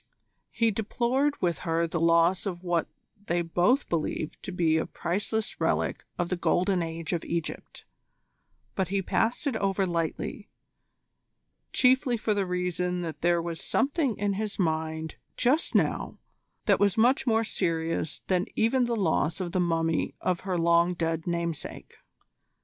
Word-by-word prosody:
He 230 -1 +1
deplored 250 +7 0
with 170 -2 +1
her 165 -1 0
the 165 0 -2
loss 170 +4 +3
of 180 -2 -5
what 175 -2 0 0.4
they 175 0 +1
both 180 - +2
believed 155 -2 -2
to - - -6
be 165 -3 +2
a 160 - -1
priceless 210 +5 -3
relic - - 0
of 175 0 -1
the 180 - 0
Golden 180 +1 +1
Age 165 0 -4
of 170 - -1
Egypt, 170 -2 -5 0.9
but 190 -2 0
he 195 +1 -1
passed 225 +9 0
it 275 -5 0
over 195 -1 +1
lightly, 170 +4 -3 1.2
chiefly 255 -1 +3
for 215 -1 0
the 200 -2 0
reason 180 0 -1
that 165 -2 -5
there 170 0 +2
was 165 -1 -4
something 280 - 0
in 205 0 0
his 210 +1 -3
mind 160 -2 -1 0.2
just 270 +7 +2
now - - +1 0.5
that - - +4
was 200 0 +2
much 250 +4 +3
more 225 -1 +3
serious 165 -6 -2
than 185 +2 +1
even 245 +3 +3
the 235 -1 -1
loss 165 -4 +1
of 180 -2 -3
the 185 - 0
mummy 165 -2 0
of 180 -2 0
her 185 -2 -2
long 170 +1 +3
dead 165 -1 -2
namesake. 170 -2 -3
180 Hz, 155 wpm, -28 LUFS, 165-215 Hz, 1.2 s, that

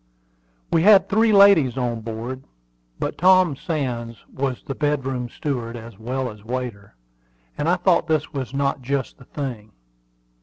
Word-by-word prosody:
We 165 - +3
had 195 0 +6
three 220 +3 +3
ladies 195 - +6
on 120 -3 -2
board; 115 +4 -6 0.5
but - - -3
Tom 185 -4 +5
Sands 130 - -3 0.2
was 130 -2 -3
the 135 - -5
bedroom 135 -4 -1
steward 120 -5 -4
as 115 -3 -11
well 125 +2 -3
as 105 -1 -14
waiter, 115 - -5 0.6
and - - -1
I - - +4
thought - - +2
this 155 -1 0
was 135 -4 -4
not 140 0 -1
just 135 +1 -3
the 125 - -15
thing. 120 -8 -6
130 Hz, 150 wpm, -22 LUFS, 120-150 Hz, 0.6 s, had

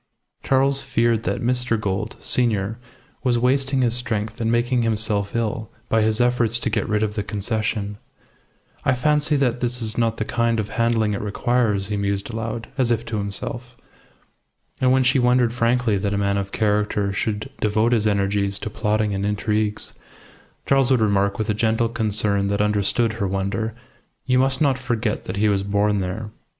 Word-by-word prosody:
Charles 135 +1 +2
feared 115 -3 +1
that - - -1
Mr. 125 -2 0
Gould, 100 0 -2
senior, 110 -3 +1 0.4
was 125 -3 +2
wasting 135 +2 +1
his 120 -2 +2
strength 110 -2 -2
and 115 0 +1
making 120 +1 +1
himself 105 -2 0
ill 110 -1 -2 0.2
by 110 - +3
his 110 +1 +1
efforts 120 -2 +2
to 120 -1 -2
get - - -1
rid 105 0 +1
of 105 -1 -1
the 105 - -2
Concession. 105 0 -2 0.8
"I 130 - +2
fancy 150 +3 +2
that 130 -3 +1
this 125 0 -1
is 110 0 -1
not 115 -1 +1
the 110 - -2
kind 115 0 0
of 105 - -2
handling 115 -2 +1
it 100 - -3
requires," 105 -1 0
he 105 - -1
mused 100 +2 -2
aloud, 115 0 -4
as 125 -2 +2
if 115 0 0
to 110 - -3
himself. 120 +5 -6 1.0
And 130 0 +4
when 130 0 +4
she 130 +2 +3
wondered 125 -1 +3
frankly 120 -3 +1
that 100 +1 -1
a - - 0
man 100 0 +1
of 100 0 -5
character 105 -1 0
should 105 +2 -3
devote 110 +2 +2
his 110 -3 +2
energies 100 -1 0
to 105 - -5
plotting 105 -1 0
and 100 0 -2
intrigues, 105 +1 -1 0.7
Charles 135 -2 +3
would 130 -2 +4
remark, 100 -2 +2
with 110 - -2
a 105 - +1
gentle 110 +2 +1
concern 105 -3 +1
that 100 0 -1
understood 105 +2 +1
her 105 -3 -2
wonder, 100 +4 -2 0.5
"You 130 -1 +3
must 130 +1 +2
not 135 -3 +2
forget 115 -3 -2
that 90 - -4
he 105 +2 +2
was 100 -2 +2
born 100 +1 +1
there." 95 +4 -4
110 Hz, 180 wpm, -22 LUFS, 105-120 Hz, 1.0 s, And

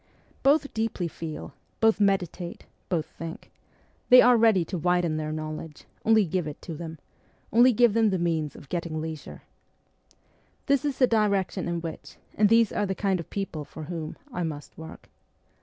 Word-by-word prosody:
Both 280 +1 +3
deeply 220 -5 -1
feel, 160 -3 -7 0.3
both 225 -1 +3
meditate, 185 -3 -1 0.2
both 165 -4 0
think; 165 0 -9 0.6
they 250 0 +10
are 245 0 +7
ready 220 -6 +4
to 185 - -4
widen 175 -1 +1
their 155 0 -3
knowledge: 155 0 -6 0.2
only 220 -2 +4
give 175 -1 -2
it 150 - -7
to 165 - -6
them; 160 0 -7 0.6
only 240 +3 +7
give 240 -1 +4
them 225 -1 +3
the 190 - 0
means 160 -4 -1
of 140 - -13
getting 170 -3 -3
leisure. 160 -1 -7 1.2
This 280 0 +2
is 285 -2 -1
the 255 - +6
direction 200 -5 +1
in 170 -1 -2
which, 165 -1 -8 0.2
and 210 -1 +3
these 230 -1 +5
are 205 - -1
the 190 - -2
kind 195 -2 0
of 165 - -7
people 195 -6 -4
for 155 +2 -10
whom, 160 -1 -6 0.2
I 200 - -3
must 150 -4 -5
work. 160 0 -11
180 Hz, 175 wpm, -26 LUFS, 160-220 Hz, 1.2 s, they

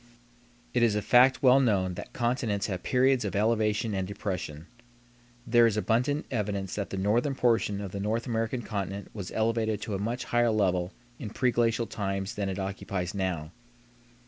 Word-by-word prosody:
It 125 - +2
is 115 -3 +3
a 105 - 0
fact 125 +6 +5
well 130 +1 +7
known 100 -8 +1
that - - -8
continents 120 -4 -1
have 95 -3 -3
periods 130 -1 +2
of 100 -3 -3
elevation 110 0 +1
and 95 -1 -2
depression. 90 -6 -5 0.8
There 120 0 +5
is 110 -2 -1
abundant 120 - +1
evidence 100 -5 -2
that 100 -2 -3
the 95 - -4
northern 115 +8 +1
portion 115 -5 +1
of 100 -2 -5
the 100 - -5
North 110 +4 -1
American 115 0 -2
continent 100 -2 -4
was 100 -3 -6
elevated 110 -1 0
to 105 - -4
a 95 - -2
much 115 +5 -2
higher 120 0 +2
level 95 -4 +1 0.3
in 105 - -5
preglacial 115 -1 +1
times 95 -1 -3
than 100 -1 -2
it 95 - -3
occupies 95 -2 -3
now. 90 -6 -2
105 Hz, 170 wpm, -28 LUFS, 95-120 Hz, 0.8 s, well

